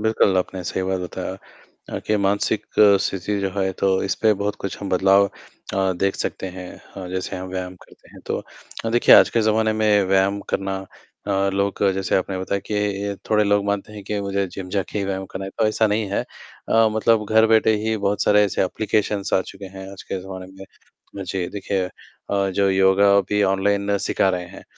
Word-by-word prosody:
बिल्कुल 110 -3 +2
आपने 90 0 -3
सही 95 - -2
बात 95 0 -1
बताया 95 +1 -5 0.5
अ, - - -3
कि 105 - +2
मानसिक 100 0 0 0.4
स्थिति 100 +1 -2
जो 95 -1 -1
है 95 0 +1
तो 100 - +2 0.2
इस 95 - 0
पर 110 -1 +5
बहुत 105 0 -1
कुछ 100 - -5
हम 100 - -4
बदलाव 95 +2 +4 0.5
अ, 95 -1 +1
देख 95 +2 -1
सकते - - -3
हैं 90 -1 -7 0.3
अ, 95 -2 -6
जैसे 95 0 -4
हम 95 0 -6
व्यायाम 90 0 -5
करते - - -21
हैं - - -13
तो - - -1 0.5
अ, - - 0
देखिए 120 +1 +6
आज - - +7
के 115 - +1
जमाने 110 0 +2
में 105 -2 +3
व्यायाम 95 +1 +2
करना 95 0 -1 0.5
अ, 100 -1 +1
लोग 100 +1 -1
जैसे 95 0 0
आपने 95 0 -2
बताया 95 +2 -2
कि 100 -1 -1
थोड़े 105 -1 +4
लोग 100 0 +2
मानते 100 +1 -2
हैं 105 -1 -9
कि 105 +1 -2
मुझे 100 0 -1
जिम 90 0 -8
जाके 100 +2 -2
ही 100 - -1
व्यायाम 95 0 -3
करना 95 - -5
है 95 - -6
तो 110 - +3
ऐसा 110 +1 +2
नहीं 105 +1 0
है 100 - 0 0.5
अ, 115 0 +4
मतलब 110 0 +2
घर 110 0 +5
बैठे 110 0 +4
ही 110 0 0
बहुत 100 0 0
सारे 105 0 +5
ऐसे 100 - 0
एप्लिकेशन्स 105 0 -1
आ - - +4
चुके 95 +1 -11
हैं 95 0 -8
आज 100 - -10
के 95 - -5
ज़माने 95 0 -8
में। 95 +1 -12
तो - - -19
मुझे 95 -1 -3
देखिए 100 -1 -2 0.5
अ, 100 -1 +1
जो 100 +1 +1
योगा 95 +1 +4
भी 105 0 +1
ऑनलाइन 100 +1 +1
सिखा 95 - +1
रहे 90 -1 -1
हैं। - - -12
100 Hz, 210 wpm, -22 LUFS, 95-105 Hz, 0.5 s, आज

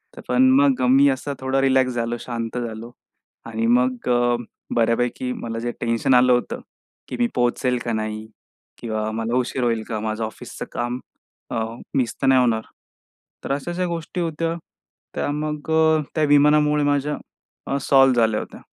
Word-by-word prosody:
तर - - -9
पण 130 +1 +4
मग 140 -3 +3
मी 135 +2 +6
असा 135 +2 -2
थोडा 130 +1 0
रिलॅक्स 130 -2 +3
झालो, 120 0 -2
शांत 115 -1 -5
झालो 115 -1 -5 0.5
आणि 115 0 -2
मग 125 0 -1 0.7
बऱ्यापैकी 120 +2 +1
मला 115 -2 -5
जे 120 +1 -2
टेन्शन 115 +2 +1
आलं 125 0 +5
होतं 125 - -1 0.5
की - - -5
मी 240 - +3
पोहोचेल 125 +1 +1
का 115 - -1
नाही? 110 0 -3 0.5
किंवा 110 -2 -3
मला 115 +2 -2
उशीर 125 0 -1
होईल 115 -2 0
का? 110 -2 -2
माझं 110 +1 -3
ऑफिसचं 110 - -8
काम 120 +1 -2 0.5
अ, 115 - -1 0.3
मिस 125 -4 0
तर 135 - +1
नाही 130 -1 +6
होणार? 115 -3 +2 0.8
तर - - -4
अशाशा 175 +6 -2
गोष्टी 170 +1 -4
होत्या 165 0 -2 0.6
त्या - - -1
मग 150 +1 -3
अ, 160 -1 +4
त्या 155 - +2
विमानामुळे 150 +1 +4
माझ्या 145 +1 0 0.5
अ, 140 - 0
सॉल्व्ह 135 -1 +5
झाल्या 110 -1 +2
होत्या. - - -9
125 Hz, 160 wpm, -22 LUFS, 115-145 Hz, 0.8 s, मी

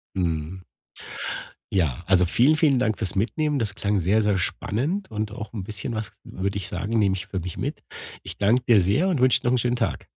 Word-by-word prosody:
Mhm. 85 0 -2 1.1
Ja, 85 -5 0
also, 90 -1 +4
vielen, 130 - +4
vielen 145 -5 +3
Dank 110 -4 +1
fürs 100 -3 -2
Mitnehmen. 145 +7 0
Das 105 -3 -2
klang 100 -2 0
sehr, 100 +6 +3
sehr 105 -2 +2
spannend 145 - -2
und 105 -1 -2
auch 110 0 -7
'n 100 -4 -4
bisschen 110 +3 -5
was, 110 -1 -4
würde 100 +2 -3
ich 95 - -4
sagen, 100 +6 -2
nehme 95 -2 +3
ich 95 - -5
für 95 -3 -3
mich 90 0 -6
mit. - - -4 0.4
Ich - - -8
danke 115 +5 +3
dir 115 -4 +7
sehr 120 - +2
und 160 -8 +1
wünsche 130 -1 +4
dir - - -2
noch 125 - +3
'n - - +3
schönen 120 +1 +1
Tag. 120 -2 -2
105 Hz, 220 wpm, -24 LUFS, 95-120 Hz, 1.1 s, dir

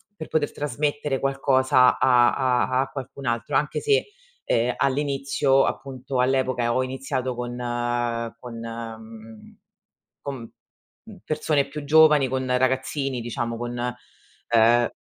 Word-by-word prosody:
per 155 - -8
poter 150 -2 0
trasmettere 145 0 -2
qualcosa 130 -2 +3
a 120 -2 +4
a 130 0 +1
a 135 - -3
qualcun 135 0 -8
altro; 120 +4 -2
anche 150 +2 +1
se, 440 +2 +1 0.4
ehm, 120 +1 +1
all'inizio, 140 0 +1
appunto 130 -1 -4
all'epoca, 130 -1 +1
ehm, - - +1
ho 130 - +2
iniziato 130 -1 -3
con 120 0 -5 0.8
con 120 -2 -9
mhmm, 115 -1 -9 0.7
con, 140 -1 -4 0.7
mhmm, 220 -2 -12
persone 150 -2 0
più 150 0 -7
giovani, 150 -2 +5
con 130 0 -2
ragazzini, 130 0 -1
diciamo 115 0 -3
con, 120 0 -5 0.7
ehm 115 +1 +4
130 Hz, 125 wpm, -24 LUFS, 120-140 Hz, 0.8 s, giovani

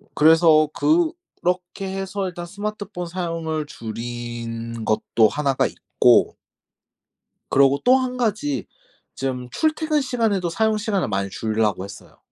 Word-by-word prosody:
그래서 160 0 +6
그렇게 305 - -1
해서 195 0 -3
일단 175 -1 -6
스마트폰 200 -1 -5
사용을 165 -3 -3
줄인 115 -2 -6
것도 110 +1 +3
1 140 +1 0
가 - - +2
있고 - - +3 1.2
그리고 140 0 +4
또 255 +1 +6
1 255 -1 -2
가지 245 +5 -1 0.5
좀 130 -2 -3
출퇴근 310 - +1
시간에도 220 -9 0
사용 220 +5 +1
시간을 205 - -1
많이 100 -2 -1
줄이려고 110 -2 -1
했어요. 100 +1 -11
170 Hz, 255 characters per minute, -22 LUFS, -, 1.2 s, 그래서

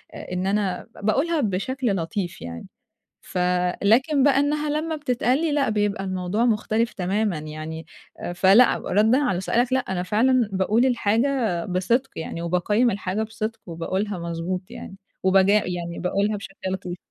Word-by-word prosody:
إن 180 +1 -4
أنا 195 -2 -1 0.2
باقولها 295 +9 +1
بشكل 230 +2 -1
لطيف 175 +1 -3
يعني. 85 0 -7 0.6
فلكن 200 - +2
بقى 275 -1 +4
إنّها 295 +1 0
لمّا 310 +2 -1
بتتقال 255 -3 +1
لي 330 -2 0
لأ، 285 -3 +1
بيبقى 205 -2 0
الموضوع 185 +4 -1
مختلف 225 0 +1
تمامًا 195 0 -1
يعني 155 +1 -7 0.5
فلأ، 195 +7 +5
ردًا 220 +5 +2
على 195 -11 0
سؤالك 240 +6 +1
لأ. 260 - +4
أنا 190 -7 -3
فعلًا 230 +4 +2
باقول 205 +6 +2
الحاجة 230 -5 +1
بصِدق 200 +9 0
يعني، 165 +1 -5
وباقيّم 195 +8 +1
الحاجة 195 +2 -2
بصِدق، 220 +1 -5
وباقولها 190 +4 -3
مضبوط 170 +2 -3
يعني. 195 - -9 0.3
وبج 190 +1 +4
يعني 175 -4 0
باقولها 200 +4 0
بشكل 195 -1 -9 0.2
لطيف. 180 -1 -5
205 Hz, 140 wpm, -24 LUFS, 180-245 Hz, 0.6 s, فلأ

